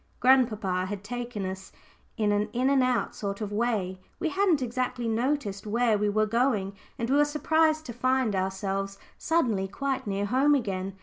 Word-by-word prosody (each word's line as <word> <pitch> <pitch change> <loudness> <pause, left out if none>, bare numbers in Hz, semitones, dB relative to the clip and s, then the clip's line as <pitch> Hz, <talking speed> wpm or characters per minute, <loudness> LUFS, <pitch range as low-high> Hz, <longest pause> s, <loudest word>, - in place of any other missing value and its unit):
Grandpapa 215 -8 +3
had 200 0 -5
taken 240 -3 -4
us 190 +1 -6 0.5
an 210 -2 +2
in 215 +6 +1
and 275 -1 +4
out 255 -2 +1
sort 200 -1 -4
of 210 -2 -4
way 205 -4 -1 0.2
we 335 - 0
hadn't 375 -3 +2
exactly 250 -1 -2
noticed 225 -3 -1
where 230 +1 +2
we 210 0 +1
were 215 +1 +2
going, 215 -3 +1 0.2
and 230 - -2
we 270 +3 +3
were 295 - +6
surprised 310 +1 +2
to 240 - -6
find 255 -2 +1
ourselves 195 +1 -2 0.2
suddenly 235 -13 +1
quite 270 +4 -3
near 200 0 -1
home 270 +7 +3
again. 195 -6 -2
230 Hz, 170 wpm, -27 LUFS, 200-260 Hz, 0.5 s, were